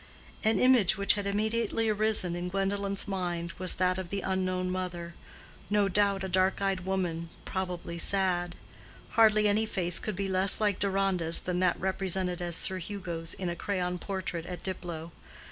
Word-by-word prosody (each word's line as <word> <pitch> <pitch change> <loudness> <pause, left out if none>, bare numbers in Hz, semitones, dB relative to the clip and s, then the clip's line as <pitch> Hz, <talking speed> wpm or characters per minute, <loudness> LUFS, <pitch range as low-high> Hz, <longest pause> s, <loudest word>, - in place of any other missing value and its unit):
An 220 0 +3
image 245 -7 +5
which 200 0 +4
had 205 -1 -2
immediately 220 +2 0
arisen 215 -4 +1
in 175 +1 -3
Gwendolen's 195 +1 -1
mind 175 -3 -2
was 185 -1 -1
that 185 0 +1
of 185 -2 -5
the 200 +1 -2
unknown 185 -1 -1
mother—no 185 +3 -3
doubt 200 0 +2
a - - -1
dark 185 +1 +2
eyed 195 -1 0
woman—probably 175 -1 -3
sad. 175 -2 +1 0.6
Hardly 215 -2 +5
any 215 +2 +2
face 175 -4 +1
could 215 - -4
be 195 +1 -2
less 190 0 +3
like 205 -3 +1
Deronda's 190 -4 +1
than 180 -1 -2
that 180 -1 +2
represented 185 -1 0
as 175 -1 -2
Sir 190 +2 -1
Hugo's 170 -3 -4
in 185 - -4
a 170 - -2
crayon 180 -1 -2
portrait 180 -3 -4
at 180 -1 -6
Diplow. 170 -3 -5
190 Hz, 160 wpm, -29 LUFS, 175-200 Hz, 0.6 s, image